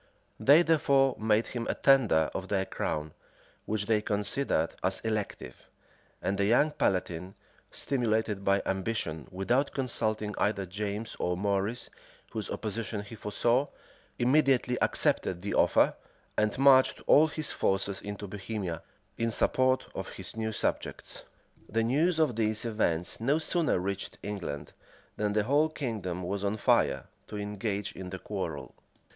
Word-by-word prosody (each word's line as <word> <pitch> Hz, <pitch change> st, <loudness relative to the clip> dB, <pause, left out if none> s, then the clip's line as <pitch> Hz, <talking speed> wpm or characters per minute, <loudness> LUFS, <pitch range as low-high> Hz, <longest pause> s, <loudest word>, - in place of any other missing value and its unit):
They 150 Hz, +5 st, +7 dB
therefore 140 Hz, -5 st, +3 dB
made 110 Hz, +1 st, +2 dB
him 120 Hz, -2 st, -4 dB
a -, -, -1 dB
tender 115 Hz, -, +4 dB
of 95 Hz, -, -4 dB
their 95 Hz, -1 st, 0 dB
crown, 75 Hz, -4 st, -3 dB, 0.5 s
which 105 Hz, -1 st, -1 dB
they 110 Hz, 0 st, +2 dB
considered 105 Hz, -, 0 dB
as 95 Hz, +1 st, +2 dB
elective; 105 Hz, -, -4 dB, 0.6 s
and 100 Hz, +1 st, -1 dB
the 100 Hz, -, +3 dB
young 125 Hz, +8 st, +4 dB
palatine, 90 Hz, -, -1 dB, 0.3 s
stimulated 110 Hz, -6 st, 0 dB
by 100 Hz, 0 st, +2 dB
ambition, 95 Hz, -5 st, -2 dB
without 120 Hz, +9 st, 0 dB
consulting 110 Hz, -5 st, -1 dB
either 100 Hz, -2 st, +1 dB
James[*] 105 Hz, +3 st, -4 dB
or 90 Hz, 0 st, 0 dB
Maurice, 100 Hz, +4 st, -1 dB, 0.4 s
whose 110 Hz, -2 st, -4 dB
opposition 110 Hz, 0 st, -3 dB
he 105 Hz, -, -11 dB
foresaw, 120 Hz, +5 st, +1 dB, 0.5 s
immediately 130 Hz, -1 st, +3 dB
accepted 90 Hz, 0 st, +1 dB
the 100 Hz, -, -2 dB
offer, -, -, +4 dB, 0.4 s
and 105 Hz, 0 st, +1 dB
marched 135 Hz, -1 st, +5 dB
all 155 Hz, +2 st, +6 dB
his 155 Hz, -1 st, -4 dB
forces 95 Hz, 0 st, -1 dB
into 100 Hz, 0 st, -6 dB
Bohemia, 95 Hz, -4 st, -4 dB, 0.4 s
in 115 Hz, 0 st, +1 dB
support 130 Hz, +3 st, +2 dB
of -, -, -5 dB
his -, -, -8 dB
new 110 Hz, 0 st, -2 dB
subjects. -, -, -3 dB, 0.4 s
The 115 Hz, +1 st, +1 dB
news 155 Hz, +9 st, +2 dB
of 155 Hz, -7 st, +2 dB
these 110 Hz, 0 st, 0 dB
events 90 Hz, -7 st, 0 dB
no 140 Hz, +6 st, +3 dB
sooner 160 Hz, -, +1 dB
reached 100 Hz, +2 st, -4 dB
England, 90 Hz, -9 st, -5 dB, 0.4 s
than 105 Hz, -1 st, -1 dB
the 105 Hz, 0 st, +2 dB
whole 145 Hz, +7 st, +3 dB
kingdom 105 Hz, -, -4 dB
was 100 Hz, +3 st, -3 dB
on 100 Hz, +2 st, 0 dB
fire -, -, +2 dB, 0.2 s
to 105 Hz, -, -6 dB
engage 105 Hz, 0 st, -3 dB
in 95 Hz, -1 st, -8 dB
the 95 Hz, -, -5 dB
quarrel. -, -, -5 dB
105 Hz, 140 wpm, -29 LUFS, 100-125 Hz, 0.6 s, They